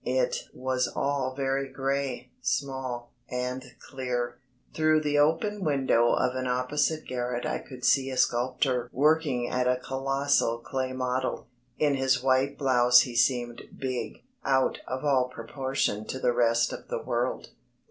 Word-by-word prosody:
It -, -, 0 dB
was 130 Hz, 0 st, -1 dB
all 140 Hz, -2 st, -1 dB
very 135 Hz, 0 st, -1 dB
grey, 135 Hz, -2 st, -2 dB
small, 130 Hz, -2 st, -2 dB, 0.2 s
and 125 Hz, +1 st, -3 dB, 0.2 s
clear. 125 Hz, -2 st, -3 dB, 0.3 s
Through 155 Hz, 0 st, +3 dB
the 145 Hz, -1 st, +1 dB
open 190 Hz, +7 st, +1 dB
window 135 Hz, -6 st, +3 dB
of 125 Hz, 0 st, +1 dB
an 130 Hz, 0 st, -2 dB
opposite 145 Hz, +5 st, 0 dB
garret 125 Hz, -1 st, -3 dB
I -, -, -1 dB
could 125 Hz, -2 st, -8 dB
see 135 Hz, -1 st, +3 dB
a 130 Hz, -, -4 dB
sculptor 125 Hz, +1 st, +1 dB
working 145 Hz, -3 st, +2 dB
at 125 Hz, 0 st, 0 dB
a 125 Hz, 0 st, +3 dB
colossal 135 Hz, -2 st, 0 dB
clay 130 Hz, +2 st, -3 dB
model. 130 Hz, -1 st, -2 dB, 0.3 s
In 150 Hz, -2 st, +2 dB
his 130 Hz, -1 st, +1 dB
white 135 Hz, +1 st, +2 dB
blouse 125 Hz, -3 st, +5 dB
he 125 Hz, -3 st, -4 dB
seemed 120 Hz, -1 st, +1 dB, 0.2 s
big, 130 Hz, -2 st, -4 dB, 0.2 s
out 135 Hz, -1 st, +2 dB
of 130 Hz, +3 st, -4 dB
all 130 Hz, -3 st, +3 dB
proportion 130 Hz, -3 st, -2 dB
to -, -, -4 dB
the 125 Hz, -2 st, +1 dB
rest 115 Hz, -1 st, +2 dB
of -, -, -8 dB
the -, -, -4 dB
world. -, -, -2 dB
130 Hz, 145 wpm, -28 LUFS, 125-140 Hz, 0.3 s, blouse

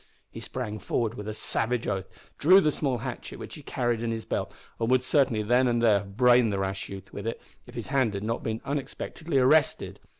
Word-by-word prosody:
He -, -, -8 dB
sprang 110 Hz, -5 st, -5 dB
forward 110 Hz, +3 st, -1 dB
with 105 Hz, -3 st, -7 dB
a 110 Hz, -, -3 dB
savage 120 Hz, +2 st, 0 dB
oath, 95 Hz, -2 st, -2 dB, 0.3 s
drew 185 Hz, +6 st, +7 dB
the 155 Hz, -6 st, +2 dB
small 135 Hz, -4 st, -1 dB
hatchet -, -, -6 dB
which -, -, -9 dB
he -, -, -9 dB
carried 120 Hz, -2 st, -1 dB
in 115 Hz, -, -1 dB
his 115 Hz, -1 st, -3 dB
belt, -, -, -2 dB, 0.3 s
and 115 Hz, 0 st, 0 dB
would 130 Hz, 0 st, +3 dB
certainly 130 Hz, -5 st, +2 dB
then 125 Hz, +4 st, +3 dB
and 120 Hz, -1 st, +2 dB
there 110 Hz, -4 st, +4 dB
have 100 Hz, 0 st, -11 dB
brained 125 Hz, -2 st, +5 dB
the 100 Hz, -, -1 dB
rash 95 Hz, 0 st, -3 dB
youth 95 Hz, -1 st, -9 dB
with 100 Hz, +2 st, -5 dB
it, 115 Hz, -, -3 dB, 0.3 s
if -, -, -13 dB
his -, -, -5 dB
hand 130 Hz, -7 st, +1 dB
had 100 Hz, -, -4 dB
not 115 Hz, +2 st, -2 dB
been 110 Hz, 0 st, -3 dB
unexpectedly 145 Hz, +2 st, -3 dB
arrested. 140 Hz, +3 st, +3 dB
115 Hz, 225 wpm, -27 LUFS, 105-130 Hz, 0.3 s, drew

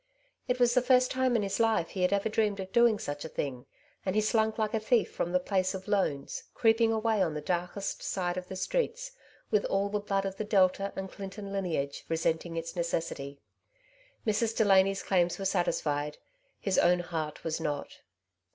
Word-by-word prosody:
It 250 Hz, 0 st, 0 dB
was 245 Hz, -1 st, +4 dB
the 250 Hz, -, +4 dB
first 255 Hz, 0 st, +4 dB
time 260 Hz, -1 st, +1 dB
in 220 Hz, -, +2 dB
his 195 Hz, +2 st, -2 dB
lifd 225 Hz, -7 st, +2 dB
he 190 Hz, -, -4 dB
had 180 Hz, +1 st, +3 dB
ever 200 Hz, +1 st, +1 dB
dreamed 210 Hz, -2 st, 0 dB
of 190 Hz, 0 st, -6 dB
doing 235 Hz, -2 st, +5 dB
such 145 Hz, -5 st, -5 dB
a 160 Hz, -, -6 dB
thing, 130 Hz, -5 st, -4 dB, 0.4 s
and 190 Hz, 0 st, -1 dB
he 215 Hz, -, +4 dB
slunk 220 Hz, 0 st, +1 dB
like 215 Hz, 0 st, 0 dB
a 225 Hz, -, +2 dB
thief 225 Hz, +2 st, +2 dB
from 175 Hz, -, -2 dB
the 180 Hz, -, +3 dB
place 185 Hz, 0 st, 0 dB
of 190 Hz, +1 st, -8 dB
loans, 190 Hz, -9 st, -1 dB
creeping 225 Hz, 0 st, +4 dB
away 220 Hz, -1 st, +1 dB
on 165 Hz, -5 st, +1 dB
the -, -, -2 dB
darkest 180 Hz, +5 st, -3 dB
sides 180 Hz, -1 st, -1 dB
of 180 Hz, -, -11 dB
the 190 Hz, -, -6 dB
streets, -, -, -1 dB, 0.4 s
with 210 Hz, -2 st, +3 dB
all 200 Hz, +1 st, 0 dB
the 210 Hz, 0 st, -1 dB
blood 195 Hz, -1 st, -1 dB
of 195 Hz, 0 st, -4 dB
the -, -, -2 dB
Delta 195 Hz, -1 st, +2 dB
and 190 Hz, 0 st, -5 dB
Clinton 200 Hz, 0 st, -7 dB
lineage 160 Hz, -8 st, -2 dB
resenting 165 Hz, +1 st, -1 dB
its 165 Hz, +2 st, -4 dB
necessity. 160 Hz, -5 st, -3 dB, 0.8 s
Mrs. 225 Hz, +1 st, +1 dB
Delany's 195 Hz, -2 st, +4 dB
claims 175 Hz, -2 st, +2 dB
were 195 Hz, -, -5 dB
satisfied; 150 Hz, -5 st, 0 dB, 0.4 s
his 195 Hz, -2 st, +1 dB
own 175 Hz, 0 st, +4 dB
heart 160 Hz, -3 st, -4 dB
was 160 Hz, 0 st, -2 dB
not. 150 Hz, -3 st, -4 dB
195 Hz, 195 wpm, -30 LUFS, 175-215 Hz, 0.8 s, doing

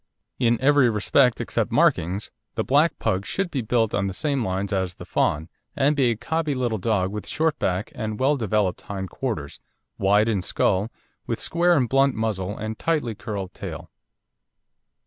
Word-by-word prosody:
In 120 Hz, -2 st, +3 dB
every 140 Hz, -2 st, +5 dB
respect 115 Hz, +4 st, +3 dB
except -, -, -1 dB
markings 95 Hz, +6 st, +2 dB, 0.2 s
the -, -, 0 dB
black 150 Hz, +5 st, +3 dB
Pug 95 Hz, +1 st, 0 dB
should 195 Hz, -, -2 dB
be 135 Hz, -, -1 dB
built 115 Hz, -1 st, +1 dB
on 100 Hz, -1 st, +1 dB
the 95 Hz, -, -4 dB
same 140 Hz, +1 st, 0 dB
lines 95 Hz, +1 st, -2 dB
as 95 Hz, -2 st, -1 dB
the -, -, -10 dB
fawn, 75 Hz, +2 st, 0 dB, 0.3 s
and 145 Hz, +1 st, +2 dB
be 135 Hz, -4 st, +3 dB
a 115 Hz, -, +1 dB
cobby 155 Hz, +5 st, -1 dB
little 120 Hz, -4 st, -1 dB
dog 95 Hz, -2 st, 0 dB
with 105 Hz, 0 st, -6 dB
short 160 Hz, -1 st, 0 dB
back 95 Hz, +3 st, -1 dB
and 110 Hz, -2 st, -4 dB
well 135 Hz, +3 st, +3 dB
developed 105 Hz, -6 st, 0 dB
hind 95 Hz, -3 st, -6 dB
quarters, 105 Hz, -, -4 dB, 0.4 s
wide 105 Hz, +3 st, +4 dB
in 105 Hz, -5 st, +1 dB
skull, 95 Hz, +3 st, +1 dB, 0.4 s
with -, -, -2 dB
square 175 Hz, 0 st, +2 dB
and 125 Hz, -3 st, +2 dB
blunt 135 Hz, +1 st, +3 dB
muzzle 105 Hz, -3 st, -2 dB
and 110 Hz, +1 st, -5 dB
tightly 150 Hz, -9 st, 0 dB
curled 100 Hz, -3 st, -5 dB
tail. -, -, -8 dB
110 Hz, 175 wpm, -24 LUFS, 100-135 Hz, 0.4 s, every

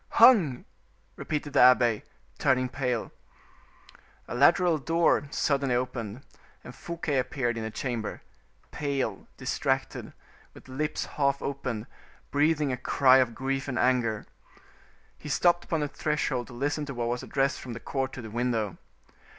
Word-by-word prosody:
"Hung!" 170 Hz, -, +6 dB, 0.5 s
repeated 150 Hz, -2 st, -4 dB
the -, -, +3 dB
abbe, 120 Hz, -3 st, +5 dB, 0.4 s
turning 130 Hz, -1 st, +2 dB
pale. 125 Hz, -2 st, -2 dB, 1.2 s
A -, -, -6 dB
lateral 160 Hz, +6 st, +4 dB
door 165 Hz, -1 st, +2 dB
suddenly 140 Hz, -3 st, +1 dB
opened, 125 Hz, -1 st, -3 dB, 0.4 s
and 125 Hz, -, -10 dB
Fouquet 165 Hz, -2 st, -2 dB
appeared 120 Hz, -2 st, -1 dB
in 115 Hz, -, -4 dB
the 110 Hz, -, -3 dB
chamber, 115 Hz, -1 st, -4 dB, 0.5 s
pale, 140 Hz, -3 st, -2 dB
distracted, -, -, -2 dB, 0.4 s
with -, -, -14 dB
lips 150 Hz, +4 st, -2 dB
half 140 Hz, -1 st, 0 dB
opened, 125 Hz, -5 st, -3 dB, 0.5 s
breathing 150 Hz, 0 st, +2 dB
a 125 Hz, -, -2 dB
cry 130 Hz, +1 st, +4 dB
of 125 Hz, -3 st, +2 dB
grief 135 Hz, +1 st, -2 dB
and 130 Hz, -, -3 dB
anger. 120 Hz, -4 st, +1 dB, 0.9 s
He 150 Hz, -, -8 dB
stopped 175 Hz, +4 st, +3 dB
upon 165 Hz, -2 st, -1 dB
the 150 Hz, -, 0 dB
threshold 140 Hz, -3 st, -2 dB
to 125 Hz, -, -12 dB
listen 145 Hz, +4 st, -1 dB
to 140 Hz, -, -6 dB
what 120 Hz, -1 st, -2 dB
was 120 Hz, +1 st, -2 dB
addressed 135 Hz, 0 st, 0 dB
from 125 Hz, -, -7 dB
the 115 Hz, -, -7 dB
court 135 Hz, +1 st, -2 dB
to 120 Hz, -, -7 dB
the 110 Hz, -, -8 dB
window. 115 Hz, -4 st, -1 dB
130 Hz, 145 wpm, -28 LUFS, 120-145 Hz, 1.2 s, Hung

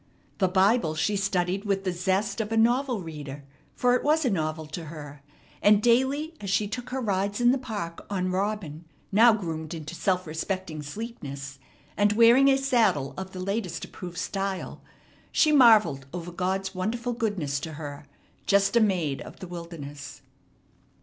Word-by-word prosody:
The 190 Hz, -, +4 dB
Bible 190 Hz, -2 st, +3 dB
she 165 Hz, +6 st, 0 dB
studied 195 Hz, -1 st, 0 dB
with 195 Hz, -2 st, -1 dB
the 185 Hz, -, 0 dB
zest 190 Hz, +4 st, 0 dB
of 215 Hz, 0 st, -5 dB
a 225 Hz, -, +1 dB
novel 240 Hz, -1 st, +2 dB
reader, 145 Hz, -3 st, -8 dB, 0.3 s
for 245 Hz, -1 st, +3 dB
it 250 Hz, -, +1 dB
was 310 Hz, +1 st, +2 dB
a 250 Hz, -, +2 dB
novel 155 Hz, -3 st, -2 dB
to 155 Hz, +2 st, -7 dB
her; 150 Hz, -2 st, -9 dB, 0.4 s
and 205 Hz, 0 st, +6 dB
daily, 265 Hz, +7 st, +2 dB
as 200 Hz, -, -5 dB
she 205 Hz, +2 st, +1 dB
took 240 Hz, +4 st, -6 dB
her 265 Hz, -, -2 dB
rides 200 Hz, -2 st, -1 dB
in 240 Hz, 0 st, +5 dB
the 265 Hz, -, +1 dB
park 205 Hz, -10 st, -5 dB
on 185 Hz, -2 st, -1 dB
Robin, 185 Hz, -5 st, -3 dB, 0.3 s
now 225 Hz, +4 st, +7 dB
groomed 165 Hz, -6 st, -3 dB
into 155 Hz, 0 st, -7 dB
self 185 Hz, +1 st, 0 dB
respecting 160 Hz, 0 st, -4 dB
sleekness, 140 Hz, -, -7 dB, 0.4 s
and 205 Hz, 0 st, +3 dB
wearing 235 Hz, +5 st, +6 dB
a 270 Hz, -, +4 dB
saddle 215 Hz, -, +2 dB
of 190 Hz, 0 st, -6 dB
the 185 Hz, -, -8 dB
latest 185 Hz, -2 st, -3 dB
approved 180 Hz, -1 st, -9 dB
style, 195 Hz, +1 st, -3 dB, 0.5 s
she 310 Hz, -, +4 dB
marvelled 220 Hz, -, +5 dB
over 175 Hz, 0 st, -5 dB
God's 190 Hz, +2 st, -2 dB
wonderful 235 Hz, +6 st, -2 dB
goodness 200 Hz, -, -1 dB
to 160 Hz, +2 st, -6 dB
her, 145 Hz, -1 st, -8 dB, 0.4 s
just 200 Hz, +2 st, +3 dB
a -, -, +7 dB
maid 180 Hz, -10 st, +1 dB
of -, -, -11 dB
the 185 Hz, -, -7 dB
wilderness. 145 Hz, -5 st, -8 dB
190 Hz, 170 wpm, -26 LUFS, 160-225 Hz, 0.5 s, now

